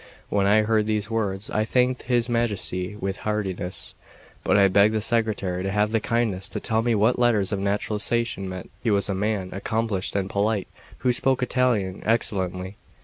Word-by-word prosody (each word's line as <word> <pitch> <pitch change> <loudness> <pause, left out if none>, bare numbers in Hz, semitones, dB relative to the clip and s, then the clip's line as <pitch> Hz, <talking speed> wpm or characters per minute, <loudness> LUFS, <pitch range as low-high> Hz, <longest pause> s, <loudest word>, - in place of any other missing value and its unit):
When 100 -1 +2
I 110 +2 +5
heard 110 0 +1
these 110 0 -1
words, 105 -3 -2
I 110 - +1
thanked 125 +2 +1
his 120 -1 0
Majesty 105 -5 -1
with 95 -1 -3
heartiness; 95 -4 -3 0.5
but - - +3
I 100 -1 +6
begged 100 +3 +4
the - - +2
secretary 110 -5 +1
to 95 - -2
have 105 +2 +1
the 115 - +2
kindness 110 -5 -1
to - - -4
tell 110 0 0
me 115 0 +1
what 110 +4 +2
letters 110 -6 +2
of 100 - -1
naturalisation 105 +1 0
meant. 95 -1 -7
He 120 - 0
was 100 -1 +2
a - - +1
man 100 -1 -1
accomplished 105 -1 -2
and 100 -1 0
polite, 100 0 0 0.3
who 125 - +1
spoke 130 +1 +1
Italian 120 -7 0
excellently. 95 -4 -1
105 Hz, 180 wpm, -24 LUFS, 95-115 Hz, 0.5 s, I